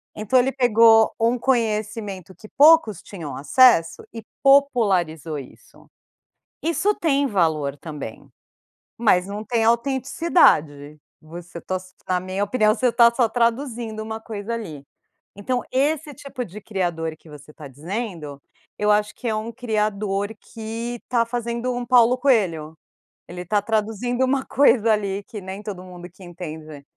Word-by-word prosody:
Então, 215 +5 +2
ele 260 +2 +1
pegou 230 -3 +5
um 230 +2 +2
conhecimento 215 -6 -2
que 215 - -14
poucos 295 - +5
tinham 165 -8 -8
acesso 165 - +4
e 225 -1 -8 0.2
popularizou 195 - +2
isso. 135 - -14 0.8
Isso 360 +6 +1
tem 285 -6 +1
valor 160 - 0
também, 145 -7 -9 0.7
mas 195 -5 +2
não 205 +2 -6
tem 230 0 0
autenticidade. 235 - +2 0.2
Você 170 +2 -10
to 185 - -4
s 185 0 -8
na 185 -1 +1
minha 185 +2 -3
opinião, 215 0 +2
você 250 -2 +1
tá 235 0 +5
só 235 -2 +2
traduzindo 235 -1 -1
uma 220 0 -6
coisa 220 0 -6
ali. 165 -12 -6 0.5
Então, 245 +5 -2
esse 295 +3 0
tipo 275 -3 -7
de 205 +2 -11
criador 175 -6 -3
que 160 - -19
você 150 0 -13
tá 150 -2 -11
dizendo, 155 - -6 0.4
eu 210 0 +2
acho 210 0 +1
que 245 - -6
é 220 - 0
um 215 +2 -4
criador 210 -4 -2
que 230 +1 -6
tá 235 -2 +2
fazendo 235 +1 -3
um 245 0 -4
Paulo 245 0 +4
Coelho. 175 - 0 0.5
Ele 180 +1 -7
tá 205 +3 +1
traduzindo 225 +3 -1
uma 265 0 0
coisa 230 -5 +3
ali 200 -1 -2
que 210 - -8
nem 190 +2 -7
todo 195 -4 -7
mundo 180 -1 -11
que 185 +2 -17
entende, 155 -4 -9
215 Hz, 145 wpm, -22 LUFS, 180-240 Hz, 0.8 s, pegou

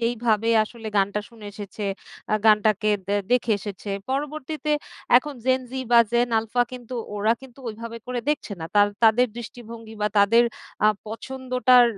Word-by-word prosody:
যেইভাবে 230 -1 +1 0.2
আসলে 225 0 -11
গানটা 200 +1 +2
শুনে 220 -3 -12
এসেছে 205 +1 -8 0.5
আ - - +5
গানটাকে 215 0 +4 0.2
দ্যা 205 +1 +1
দেখে 240 -2 +3
এসেছে 205 0 -7 0.2
পরবর্তীতে 300 +2 -3 0.5
এখন 285 +3 +1
Gen 260 0 +3
Z - - -15 0.2
বা 235 - +8
Gen 240 +1 +3
Alpha 225 +2 +1
কিন্তু 250 0 -8 0.2
ওরা 215 +2 +3
কিন্তু 265 0 -14
ওইভাবে 230 +1 -7
করে 250 -1 -2
দেখছে 295 -7 -2
না - - -4
,তার 205 0 +6 0.2
তাদের 225 +3 +5
দৃষ্টিভঙ্গি 230 -2 -9
বা 210 - +3
তাদের 230 +4 +5 0.4
আ - - +7 0.2
পছন্দটার 255 +1 +3
230 Hz, 155 wpm, -24 LUFS, 215-250 Hz, 0.5 s, বা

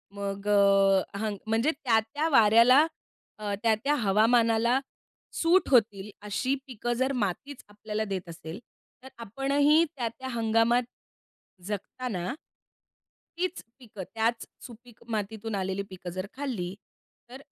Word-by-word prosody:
मग 200 0 -5
अ, 195 -1 +3
हंग 215 -2 -2
म्हणजे 225 +8 +2
त्या, 250 -7 +1
त्या 290 +9 -2
वाऱ्याला, 235 +4 +6 0.5
अ, 205 -1 -3
त्या, 225 -1 +4
त्या 290 +2 +2
हवामानाला 230 +4 +3 0.5
सूट 345 +2 +2
होतील 210 -5 +2 0.2
अशी 255 +6 -1
पिकं 240 -1 -3
जर 260 +3 0
मातीच 270 +9 -5
आपल्याला 210 +1 -4
देत 185 -3 -5
असेल, 165 +3 -8 0.4
तर 265 - -10
आपणही 280 +7 +2
त्या 240 -3 -2
त्या 260 +3 -9
हंगामात 230 +1 +2 0.8
जगताना 210 -1 -4 1.0
तीच 365 0 -2 0.2
पिकं, 210 -6 -9
त्याच 230 +1 0 0.2
सुपीक 240 -1 -14
मातीतून 220 0 -3
आलेली 190 0 -2
पिकं 185 -1 -8
जर 185 - -2
खाल्ली 225 -11 -4 0.6
तर 260 +2 -10
225 Hz, 125 wpm, -27 LUFS, 200-255 Hz, 1.0 s, वाऱ्याला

